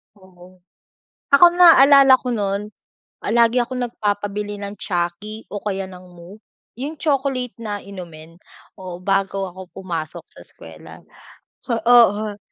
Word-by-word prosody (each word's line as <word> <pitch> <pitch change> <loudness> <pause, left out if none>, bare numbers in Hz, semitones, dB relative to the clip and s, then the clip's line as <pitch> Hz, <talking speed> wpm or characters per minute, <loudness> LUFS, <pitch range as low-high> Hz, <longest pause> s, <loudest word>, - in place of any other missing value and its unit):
Oo. 185 -1 -19 0.7
Ako 350 +5 +8
naalala 280 -6 +7
ko 250 - -6
nun, 205 -1 -3 0.5
palagi 235 +1 +2
akong 250 +1 -3
nagpapabili 205 -2 -4
ng 200 0 -7
Chuckie 175 +5 -4
o 205 - -5
kaya 195 -2 -4
ng 180 0 -13
Moo, 175 +5 -14 0.4
'yung 285 +5 -5
chocolate 270 -4 -1
na 210 -3 -6
inumin 170 -4 -12 0.4
o 180 -1 -9
bago 195 0 -1
ako 185 +1 -11
pumasok 165 -4 -6
sa - - -19
eskuwela. - - -14 0.7
O 235 - +1
oo. 220 -3 +3
205 Hz, 125 wpm, -20 LUFS, 185-240 Hz, 0.7 s, Ako